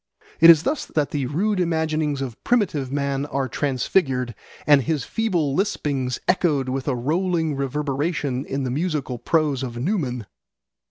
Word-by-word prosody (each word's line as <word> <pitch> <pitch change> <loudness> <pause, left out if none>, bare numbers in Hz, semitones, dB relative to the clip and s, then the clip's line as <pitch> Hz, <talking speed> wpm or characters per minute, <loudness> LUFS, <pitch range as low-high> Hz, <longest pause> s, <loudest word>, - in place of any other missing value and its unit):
It 165 - +9
is 165 -2 +8
thus 285 - -1
that 150 -2 -1
the 140 -4 -1
rude 190 +8 0
imaginings 155 -4 0
of 120 -4 -8
primitive 170 - +1
man 140 0 -1
are 135 -1 -1
transfigured 130 -2 0 0.3
and 145 -2 +6
his 150 +1 -1
feeble 175 -11 0
lispings 140 - -1
echoed 150 -8 +2
with 130 +2 -3
a 135 - +1
rolling 160 +4 0
reverberation 140 0 -2
in 135 0 -3
the 130 - -2
musical 145 -4 -2
prose 150 -4 +1
of 120 -3 -5
Newman. 125 - -2
145 Hz, 150 wpm, -23 LUFS, 135-165 Hz, 0.3 s, It